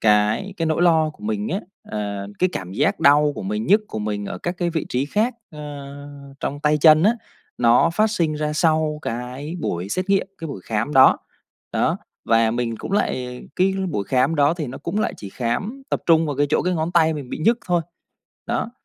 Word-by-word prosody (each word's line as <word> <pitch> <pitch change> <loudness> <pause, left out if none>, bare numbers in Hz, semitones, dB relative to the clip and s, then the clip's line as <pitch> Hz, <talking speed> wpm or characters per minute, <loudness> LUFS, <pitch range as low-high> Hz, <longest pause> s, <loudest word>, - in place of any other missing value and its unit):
cái 105 - +2
cái 165 - -1
nỗi 160 +2 +1
lo 160 -3 +4
của 170 +7 -19
mình 215 0 -2
á, 195 - -1 0.3
ờ, 100 -2 -3
cái 185 - +3
cảm 95 -1 -5
giác - - +1
đau 145 +1 +5
của 215 - -6
mình, 210 +3 -3
nhức 210 +3 +5
của 110 - -5
mình 105 -1 -3
ở - - -5
các 175 - -3
cái 175 -1 0
vị 160 -2 -2
trí 125 +2 0
khác, 220 - 0 0.2
a, 150 - -10 0.8
trong 145 +1 -3
tay 150 0 +2
chân 155 +1 +7
á, 215 +5 +5 0.5
nó 120 +7 +4
phát 215 +6 +2
sinh 165 -7 0
ra 150 0 -2
sau 155 -1 +1
cái 125 +7 -5
buổi 90 - -3
xét 185 - -2
nghiệm, 195 -1 +3
cái 165 - -5
buổi 135 - -6
khám 115 +6 -2
đó, 130 -1 +7 0.6
đó. - - +1 0.3
Và 115 -1 +4
mình 115 0 -2
cũng 190 - -7
lại 125 -11 -1
cái 190 +1 +2 0.2
buổi 100 -10 -2
khám 130 +7 +2
đó 145 +1 +3
thì 160 -4 -4
nó 130 - -7
cũng 170 +8 -3
lại - - -1
chỉ 100 - -8
khám 130 - -3
tập - - 0
trung 165 -1 +5
vào 145 -3 -3
cái 145 - +2
chỗ - - +2
cái 180 0 0
ngón 165 +2 -2
tay 160 -2 +4
mình 140 -4 -7
bị - - -4
nhức 230 +9 +3
thôi. 175 -2 +2 0.6
Đó, 225 - -1
155 Hz, 220 wpm, -22 LUFS, 125-180 Hz, 0.8 s, chân